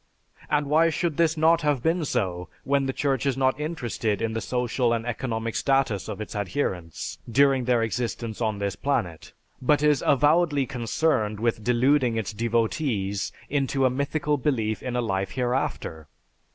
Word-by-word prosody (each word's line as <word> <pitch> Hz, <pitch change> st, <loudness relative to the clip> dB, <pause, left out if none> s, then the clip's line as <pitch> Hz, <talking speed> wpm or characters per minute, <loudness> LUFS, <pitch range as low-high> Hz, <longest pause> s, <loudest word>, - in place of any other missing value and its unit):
And 150 Hz, -1 st, +2 dB
why 160 Hz, +3 st, +4 dB
should 165 Hz, -1 st, -1 dB
this 165 Hz, -1 st, +2 dB
not 165 Hz, +2 st, +4 dB
have 145 Hz, -5 st, 0 dB
been 165 Hz, 0 st, +1 dB
so, 90 Hz, -9 st, -2 dB
when 140 Hz, -1 st, +1 dB
the -, -, 0 dB
Church 135 Hz, -1 st, 0 dB
is 135 Hz, -1 st, 0 dB
not 130 Hz, +1 st, +1 dB
interested 120 Hz, -, -2 dB
in 115 Hz, -1 st, -1 dB
the 115 Hz, -, -2 dB
social 125 Hz, +2 st, 0 dB
and 115 Hz, -1 st, -2 dB
economic 115 Hz, -2 st, -3 dB
status 135 Hz, -8 st, +1 dB
of -, -, -5 dB
its 110 Hz, -, -6 dB
adherents 90 Hz, -, -3 dB
during 135 Hz, +1 st, +3 dB
their 120 Hz, -2 st, +2 dB
existence 115 Hz, -1 st, -3 dB
on 110 Hz, -2 st, 0 dB
this 100 Hz, -1 st, -2 dB
planet, 95 Hz, -, -2 dB, 0.3 s
but 145 Hz, +3 st, +2 dB
is 150 Hz, -2 st, +3 dB
avowedly 145 Hz, 0 st, +3 dB
concerned 120 Hz, -4 st, 0 dB
with 115 Hz, -1 st, 0 dB
deluding 125 Hz, 0 st, +2 dB
its 110 Hz, -1 st, -3 dB
devotees 110 Hz, -, -1 dB, 0.2 s
into 135 Hz, -1 st, 0 dB
a 130 Hz, -, +3 dB
mythical 145 Hz, +2 st, 0 dB
belief 115 Hz, -7 st, -1 dB
in 125 Hz, -1 st, -4 dB
a 125 Hz, -, +1 dB
life 95 Hz, -4 st, -1 dB
hereafter? 125 Hz, -, -2 dB
125 Hz, 165 wpm, -25 LUFS, 110-145 Hz, 0.3 s, why